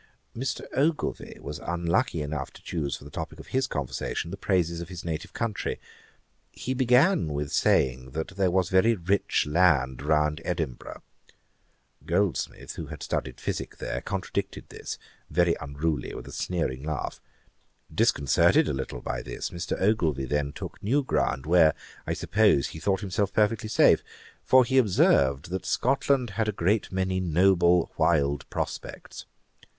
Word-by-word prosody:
Mr. 130 +3 -3
Ogilvie 150 +3 -1
was 75 +1 -6
unlucky 85 - 0
enough 70 -2 -4
to - - -16
choose 75 -5 -2
for - - -15
the 75 - -11
topick 80 -1 -6
of - - -11
his 130 0 +1
conversation 70 - -3
the - - -3
praises 85 -4 0
of 85 - -7
his 90 -2 -8
native 80 -2 -4
country. 115 -4 -3 0.7
He 130 - -4
began 130 - +4
with 70 0 -3
saying, 65 0 +2
that 80 +3 -3
there 95 -1 +1
was 90 -1 +1
very 110 +5 +4
rich 95 +2 +1
land 75 -6 +3
round 75 +1 +1
Edinburgh. 80 -8 -4 1.0
Goldsmith, 90 +1 -1
who - - -5
had - - -8
studied 65 -3 -3
physick - - -4
there, - - -4
contradicted 95 +1 -4
this, - - -6 0.3
very 85 +1 +3
untruly, 75 +1 -2
with - - -8
a - - -8
sneering 80 -8 -2
laugh. 75 -2 -4 0.7
Disconcerted 70 -3 +3
a - - 0
little 65 -2 -4
by - - -3
this, - - -5
Mr. 85 0 -3
Ogilvie 85 -10 +1
then 70 +1 -1
took - - -8
new 135 +8 +1
ground, 65 - 0
where, 80 -2 +5 0.3
I - - 0
suppose, 70 - +2
he 80 - -8
thought 95 +3 0
himself 100 0 -1
perfectly 110 +1 +1
safe; - - +5 0.4
for 130 -1 +6
he 130 +2 +3
observed, 70 - +3
that 95 - -2
Scotland 130 -2 +1
had 110 +1 -1
a - - +2
great 100 +2 0
many 95 0 0
noble 90 0 +3
wild 70 -4 +1
prospects. - - -5
85 Hz, 155 wpm, -27 LUFS, 75-100 Hz, 1.0 s, for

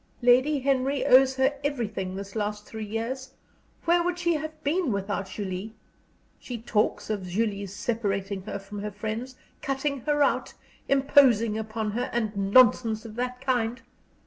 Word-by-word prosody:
Lady 260 +5 +5
Henry 270 +1 +1
owes 265 +1 +6
her 265 +2 +2
_every_thing 215 -9 -2
this 195 +1 -7
last 210 -1 -2
three 220 -1 -7
years. 255 +5 -4 0.5
Where 345 +1 +4
would 350 0 -1
she 345 -1 +1
have 310 0 -5
been 315 -1 +1
without 200 -1 -2
Julie? 200 +2 -5 0.6
She 245 - -6
talks 215 -1 0
of 195 -3 -3
Julie's 200 0 -1
separating 200 -4 -2
her 210 - -4
from 200 +1 -8
her 210 +1 -3
friends, 220 +5 -5 0.3
cutting 275 0 -1
her 295 -1 +3
out, - - 0 0.3
imposing 265 -5 +4
upon 220 0 -3
her, 245 +4 -2
and 220 -3 -1
nonsense 220 +2 +4
of 220 - -8
that 250 +1 -3
kind! 245 -2 0
230 Hz, 150 wpm, -27 LUFS, 210-265 Hz, 0.6 s, owes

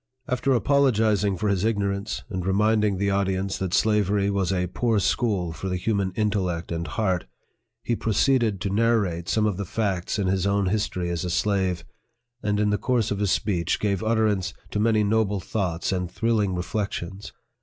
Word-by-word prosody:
After 130 +2 +1
apologizing 110 -6 +2
for 105 - -1
his 100 -2 +1
ignorance, 100 -2 -1
and 95 -6 -4
reminding 105 +1 +2
the 100 +1 0
audience 95 0 -1
that 95 -2 -2
slavery 105 -1 +2
was 95 -2 0
a 90 -1 0
poor 110 +5 0
school 95 -4 0
for 95 +4 -5
the 90 - -1
human 100 0 0
intellect 95 -6 -1
and 85 -1 -3
heart, 95 -2 -1
PREFACE, - - -35
V - - -48
he - - +3
proceeded 110 -3 +1
to 100 0 -2
narrate 100 -6 +1
some 110 -1 +2
of 105 -4 0
the 100 - -2
facts 100 -1 -2
in 100 - 0
his 95 0 +1
own 100 -1 +1
history 90 -4 -1
as 85 +1 -2
a 90 - -2
slave, 95 -1 0 0.6
and 105 0 0
in 105 0 +2
the 105 - 0
course 120 -4 0
of 100 - -1
his 100 -2 +1
speech 90 -4 0
gave 100 -2 0
utterance 110 -5 +1 0.2
to 105 - -1
many 110 0 +3
noble 105 -1 +1
thoughts 90 -4 -2
and 90 -2 -1
thrilling 110 -5 0
reflec' 100 +4 -2
tions. 95 +4 -6
100 Hz, 185 wpm, -25 LUFS, 95-110 Hz, 0.6 s, he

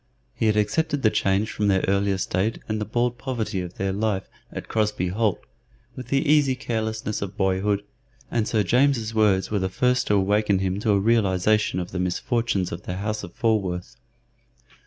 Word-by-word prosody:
He 110 - 0
had 105 0 +2
accepted 145 +8 0
the 110 - +4
change 100 +2 +1
from 105 - -1
their 95 -2 +2
earlier 100 0 +1
state 95 +4 -1
and 110 0 -2
the - - -1
bald 120 +2 -1
poverty 115 -7 -2
of 90 0 -7
their 95 0 -1
life 100 -1 -1 0.2
at - - -7
Crosbey 105 -4 0
Holt 105 +1 0 0.6
with 130 -2 -8
the 135 +4 +1
easy 145 -3 +4
carelessness 110 -3 -3
of 100 0 -5
boyhood, 100 +1 +1 0.5
and 115 -3 0
Sir 110 -2 +1
James's 120 +1 +2
words 105 -3 +2
were 105 - +1
the 95 0 -1
first 125 +5 +1
to 105 - +3
awaken 100 +1 +2
him 95 +1 -1
to 110 - -1
a 100 - +3
realization 105 -2 +2
of 90 0 -5
the 90 - -3
misfortunes 95 +1 -1
of 85 - -5
the 90 - -5
house 105 +2 -3
of 85 - -8
Falworth. 100 -2 -1
105 Hz, 185 wpm, -24 LUFS, 95-115 Hz, 0.6 s, the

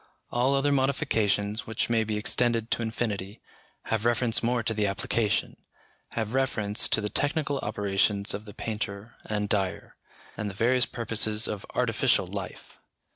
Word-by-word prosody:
All 125 +3 +2
other 140 +1 +2
modifications, 115 -7 +1
which 110 -1 -1
may 115 -1 +2
be 110 -1 -2
extended 115 +1 +1
to - - +1
infinity, 110 -3 -3 0.4
have 110 -1 -1
reference 120 0 +2
more 120 0 +1
to 115 - 0
the 105 -2 +1
application, 105 +2 0 0.6
have 110 0 -2
reference 115 -5 +1
to 110 - +3
the 105 - -2
technical 145 +1 +1
operations 100 -1 0
of 105 +2 -5
the 105 - -10
painter 105 0 -4
and 105 -1 -1
dyer, 95 -3 -1 0.4
and 105 - -3
the 95 - -8
various 125 +4 +3
purposes 110 -1 +1
of 105 -2 -5
artificial - - +2
life. - - -7
110 Hz, 150 wpm, -27 LUFS, 105-120 Hz, 0.6 s, to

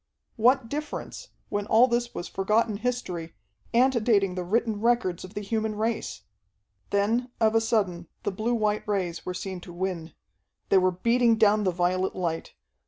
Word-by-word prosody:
What 245 +2 +3
difference, 295 +4 -5 0.2
when 205 0 -2
all 230 +3 +6
this 240 0 -1
was 175 - -4
forgotten 210 +2 +1
history, 190 -9 -3 0.4
antedating 230 -6 +3
the 180 0 -3
written 215 +3 0
records 235 -7 +1
of 185 +2 -11
the 205 - -3
human 220 +1 -2
race? 215 - -2 0.7
Then 225 +5 +1
of 220 -1 +3
a 225 - +4
sudden 195 -7 0 0.2
the - - -1
blue 220 +5 -1
white 215 -2 0
rays 185 -5 -2
were 180 - -3
seen 185 -1 -5
to 175 - -10
win. 175 -2 -4 0.6
They 195 - +6
were 185 0 +3
beating 230 +6 +3
down 215 -1 +4
the 185 - +3
violet 180 +2 0
light. 170 -3 -3
210 Hz, 165 wpm, -27 LUFS, 185-230 Hz, 0.7 s, all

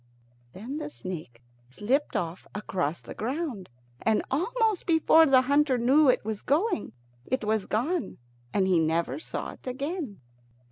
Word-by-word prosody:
Then 240 +9 -6
the 300 -1 -5
snake 160 - -8 0.3
slipped 250 - -1
off 170 +1 -3
along 180 -7 -1
the - - -8
ground, 250 - -3 0.3
and 220 -1 +2
almost 435 - 0
before 320 -1 +6
the 260 -2 +5
hunter 280 0 +3
knew 265 +5 +5
it 250 - +2
was 215 -1 -3
going, 305 - 0 0.3
it 260 -2 -1
was 215 -1 0
gone, 305 +11 -1 0.3
and 195 - +2
he 180 -3 +4
never 165 - 0
saw - - -5
it - - -15
again. 275 - -4
255 Hz, 145 wpm, -27 LUFS, 200-300 Hz, 0.3 s, before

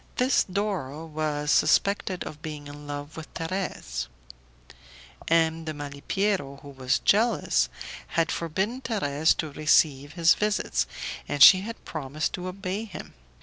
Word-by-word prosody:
This 255 +2 +3
Doro 180 -7 -3
was 150 -2 -2
suspected 195 -2 +2
of 150 0 -9
being 150 -2 -7
in 145 0 -10
love 145 +1 -6
with 160 -1 -9
Thérèse; 165 - -3 1.2
M. 165 0 +2
de 155 -1 -5
Malipiero, 145 +2 -2
who 145 - -10
was 130 -2 0
jealous, 225 +4 +2 0.5
had 165 -1 +2
forbidden 190 +10 -2
Thérèse 160 - +1
to 155 -2 -3
receive 145 -1 +2
his 170 0 +5
visits, 195 - 0 0.4
and 145 - +4
she 185 -1 +10
had 225 +3 -8
promised 150 0 -3
to 180 0 -4
obey 195 +3 -4
him. 205 - -9
160 Hz, 135 wpm, -26 LUFS, 145-190 Hz, 1.2 s, she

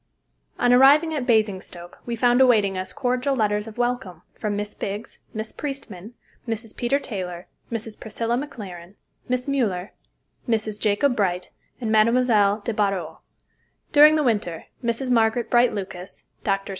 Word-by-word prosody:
On 245 0 +3
arriving 290 +6 +6
at 275 -4 -3
Basingstoke 190 -6 -1
we 235 - -2
found 245 +2 +3
awaiting 215 -7 +4
us 185 0 -4
cordial 255 +1 0
letters 210 -2 0
of 220 - -10
welcome 240 -9 -2
from 210 -1 -3
Miss 205 0 -4
Biggs, 205 +3 -6
Miss 220 -1 -5
Priestman, 235 -7 -7 0.3
Mrs. 225 -1 -4
Peter 245 +3 +1
Taylor, 185 -9 -6 0.3
Mrs. 225 -1 -5
Priscilla 230 +2 -2
McLaren, 200 -9 -7 0.3
Miss 250 0 0
Müller, 215 -9 -1 0.6
Mrs. 215 -2 -1
Jacob 230 +5 +2
Bright, 180 -4 -1 0.3
and 225 -3 -2
Mme. 220 +2 +4 0.5
de 230 - -2
Barrau. 195 -5 -1 0.7
During 300 +1 +8
the 305 - +2
winter 205 - -1 0.2
Mrs. 235 +2 -1
Margaret 230 0 +2
Bright 240 0 +5
Lucas, 185 -2 -7 0.2
Drs. 195 -1 -1
225 Hz, 145 wpm, -23 LUFS, 200-245 Hz, 0.7 s, During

